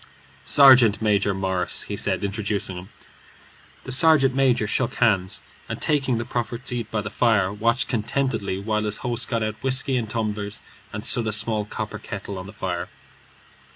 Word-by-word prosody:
"Sergeant 130 -7 +7
Major 105 -2 +2
Morris," 95 -2 -1
he 105 - -5
said, 100 -1 -1
introducing 100 -2 -2
him. 90 +1 -9 0.9
The 135 - -7
sergeant 135 -1 +4
major 130 -4 +2
shook 120 +4 -1
hands, 100 -6 +1 0.3
and - - -4
taking 135 -5 +1
the 115 - -3
proffered 120 +1 -4
seat 120 -3 -3
by 110 -2 -2
the 105 0 -6
fire, 105 -5 +2
watched 115 +5 0
contentedly 115 -4 -1
while 105 +2 -2
his 105 0 -1
host 120 -1 +1
got 115 -3 -1
out 110 0 -4
whiskey 130 0 +1
and 115 -3 -3
tumblers 105 -2 -3 0.3
and 105 +2 -6
stood 120 -2 +2
a - - 0
small 105 0 +1
copper - - -6
kettle 100 -2 -7
on 90 - -8
the - - -9
fire. 90 -4 -4
110 Hz, 170 wpm, -23 LUFS, 100-125 Hz, 0.9 s, Sergeant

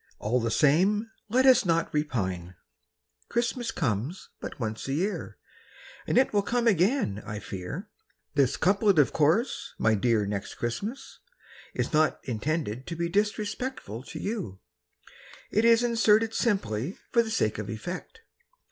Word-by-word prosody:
All 120 +4 0
the 115 -1 -1
same, 190 - +3 0.2
Let 255 +4 +3
us 260 -1 +7
not 165 -3 +1
repine: 95 - -2 0.7
Christmas 235 0 -1
comes 125 - -2
but - - -7
once 110 -1 -3
a 135 - -1
year, 190 +8 -2 0.7
And - - +1
it 260 - +4
will 205 - +4
come 240 +4 0
again, 195 - +2
I 105 - -5
fear. 100 - -6 0.5
This 140 -4 +2
couplet, 200 +1 +3
of 145 -6 +4
course. 165 - +1
My 110 - +3
dear 110 0 +2
Next 100 -1 -4
Christmas, 205 - -5 0.6
Is - - -2
not 155 0 +3
intended 130 -1 -2
to 170 - -4
be 170 0 -1
Disrespectful 210 - -2
to 160 - -7
you; 195 - -4 0.9
It 215 +2 +2
is 230 0 +6
inserted 225 -1 +3
simply 175 - -1
For 235 - +5
the 225 - -4
sake 110 - 0
of 105 -1 -5
effect. 175 - -6
170 Hz, 145 wpm, -28 LUFS, -, 0.9 s, us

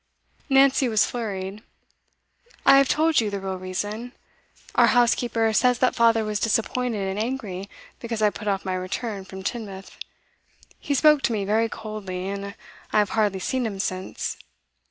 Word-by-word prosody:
Nancy 270 -1 +4
was 220 -1 +3
flurried. 205 -3 -4 1.0
'I 275 - +8
have 275 -1 +4
told 315 -3 +3
you 215 - -1
the 200 -1 -3
real 190 -1 -4
reason. 205 +6 -4 0.6
Our - - +5
housekeeper 235 -2 +2
says 250 +2 +3
that 255 +1 +2
father 230 -2 +3
was 210 -1 -2
disappointed 225 -1 0
and 190 +2 -3
angry 215 -5 -4 0.3
because 235 -2 -4
I 210 - +4
put 210 - -8
off 195 -1 -1
my 185 - -1
return 190 +2 -4
from 190 0 -9
Teignmouth. 200 -4 -5 0.9
He 285 - -1
spoke 300 +1 +5
to 235 - 0
me 205 -2 -1
very 220 +3 +1
coldly, 195 -5 -6
and 200 0 -5 0.4
I - - +2
have 210 -1 +2
hardly 210 -3 +1
seen 260 +5 -1
him 200 -3 -5
since. 185 -1 -3
215 Hz, 160 wpm, -24 LUFS, 195-240 Hz, 1.0 s, I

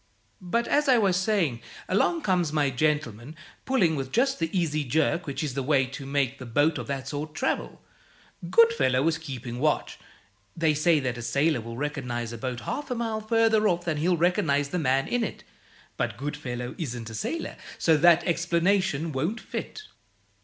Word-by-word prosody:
But, 230 +6 -1
as 295 0 +2
I 255 - +6
was 195 -5 +3
saying, 180 - +1 0.3
along 320 - +1
comes 180 -5 +1
my 145 -3 +1
gentleman, 145 -2 -1 0.3
pulling 195 -12 +2
with 135 -2 -4
just 270 +1 +1
the 165 -1 0
easy 155 -5 0
jerk 155 +5 0
which 140 +3 -3
is 145 -4 -3
the 135 - -2
way 135 0 +2
to 135 +1 -8
make 140 -1 -1
a - - -6
boat 145 +5 +2
of 120 - -6
that 135 -2 -4
sort 150 +1 -5
travel. - - -2 0.7
Goodfellow 185 - +4
was 160 +1 +1
keeping 125 -5 -6
watch. 150 +2 0 0.6
They 160 -2 +3
say 155 +1 +3
that 125 -2 -3
a - - -5
sailor 140 +4 +1
will 115 +1 -8
recognize 125 -5 -3
a 115 - -7
boat 125 -1 -4
half 285 - -4
a 250 - -1
mile 225 -2 -2
further 220 -1 +3
off 175 -2 0
than 160 -3 -1
he'll 175 +3 +2
recognize 160 -5 +1
the 180 - -2
man 135 -2 +1
in 245 -1 0
it, - - -5 0.5
but - - -2
Goodfellow 130 -3 -5
isn't 120 -7 -5
a - - -8
sailor, 320 - -4 0.2
so 160 - +3
that 170 +2 +5
explanation 170 -1 +1
won't 160 - -2
fit. 430 - -6
155 Hz, 180 wpm, -26 LUFS, 130-180 Hz, 0.7 s, I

